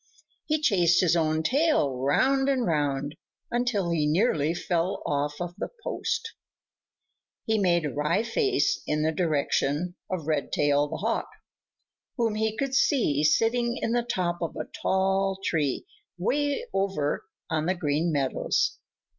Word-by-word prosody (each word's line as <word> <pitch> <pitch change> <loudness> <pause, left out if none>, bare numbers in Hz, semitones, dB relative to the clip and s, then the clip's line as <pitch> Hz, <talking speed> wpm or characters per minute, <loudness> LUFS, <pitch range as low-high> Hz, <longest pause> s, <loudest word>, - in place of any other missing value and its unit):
He 310 0 +1
chased 180 - +3
his 175 -2 +3
own 160 -1 +1
tail 275 - +2
round 270 - +2
and 260 -3 +1
round 145 -3 0 0.4
until 240 -7 0
he 155 -3 +1
nearly 160 -2 +2
fell 175 +3 -1
off 145 +1 -1
of 175 -1 -4
the - - -3
post. 455 0 -2 1.1
He 220 -2 +1
made 175 -4 +2
a 145 - -3
wry 150 +9 +1
face 400 - +1
in 150 0 0
the 160 - +2
direction 155 0 0 0.2
of 185 -5 -3
Redtail 145 -1 +1
the - - -5
Hawk, - - -1 0.9
whom 230 -3 +1
he 220 0 -1
could 275 0 -2
see 220 - +2
sitting 235 +9 +2
in 230 - -2
the 240 0 +2
top 180 -7 -2
of 170 - -3
a - - -4 0.2
tall 195 0 +1
tree 145 -5 0 0.3
way 285 - 0
over 190 -7 -1 0.3
on 160 0 0
the 185 - +1
Green 160 0 0
Meadows. 140 -3 0
175 Hz, 145 wpm, -27 LUFS, 150-230 Hz, 1.1 s, chased